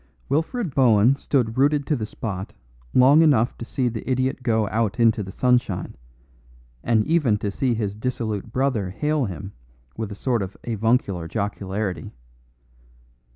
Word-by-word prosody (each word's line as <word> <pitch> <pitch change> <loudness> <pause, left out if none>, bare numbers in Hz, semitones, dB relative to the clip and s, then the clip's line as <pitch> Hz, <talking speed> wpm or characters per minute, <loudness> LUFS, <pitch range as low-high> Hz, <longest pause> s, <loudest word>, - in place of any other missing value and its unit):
Wilfred 165 - -1
Bohun 120 -1 +5
stood 130 -4 -1
rooted 145 +1 +3
to 150 - +1
the 110 -5 -4
spot 100 -4 -6 0.4
long 135 - +6
enough 130 -7 +3
to - - -5
see 130 +1 -1
the 115 +1 -4
idiot 130 +1 0
go 110 -3 +1
out 115 0 -1
into 115 -2 +4
the 95 -1 -6
sunshine, 125 -4 0 0.9
and 110 -2 +2
even 150 -10 +2
to 105 -1 -3
see 125 +3 0
his 105 -3 -2
dissolute 110 -2 -3
brother 125 -7 0
hail 150 +8 0
him 95 0 -7 0.4
with 110 -2 -4
a - - -6
sort 120 +1 0
of 95 0 -6
avuncular 110 -6 0
jocularity. 100 -3 -3
115 Hz, 150 wpm, -23 LUFS, 105-130 Hz, 0.9 s, long